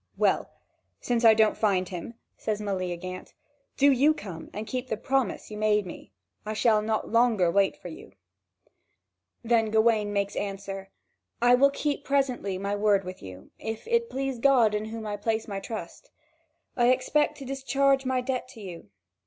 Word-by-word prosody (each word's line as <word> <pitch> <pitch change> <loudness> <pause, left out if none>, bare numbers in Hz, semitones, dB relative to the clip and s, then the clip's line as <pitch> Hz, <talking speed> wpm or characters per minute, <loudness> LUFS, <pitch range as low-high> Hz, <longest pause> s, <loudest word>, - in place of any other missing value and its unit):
"Well, - - +2 0.5
since 240 -1 -1
I 225 -1 +8
don't 215 -1 +3
find 190 -4 +1
him," 180 +6 -7 0.2
says 215 -1 -3
Meleagant, 185 -2 -4 0.4
"do 280 +1 +5
you 285 +4 +4
come 185 - -8
and 210 +1 -5
keep 255 +2 -4
the 220 - -2
promise 260 -2 -1
you 210 - -6
made 210 -1 +2
me: 175 - -10 0.3
I 215 - -4
shall 215 0 +3
not 220 0 -2
longer 230 -7 +3
wait 200 +1 +2
for 180 - -9
you." 130 - -12 1.3
Then 225 -1 +2
Gawain 220 -1 +2
makes 200 -1 -1
answer: 195 -1 -5 0.5
"I 245 +1 +5
will 275 +3 +6
keep 285 0 -2
presently 260 -9 0
my 200 +2 -2
word 205 -1 +2
with 185 0 -8
you, 95 0 -11
if 220 - -6
it 470 0 +1
please 270 -2 -3
God 240 -5 +4
in 210 0 -1
whom 220 0 -6
I 205 -1 -3
place 220 +1 -1
my 200 -2 -4
trust. 195 -3 -8 0.7
I 240 -1 +3
expect 255 +4 +2
to 275 - -8
discharge 270 +1 +1
my 260 -1 0
debt 255 0 -3
to - - -11
you. 175 - -9
220 Hz, 170 wpm, -27 LUFS, 200-255 Hz, 1.3 s, I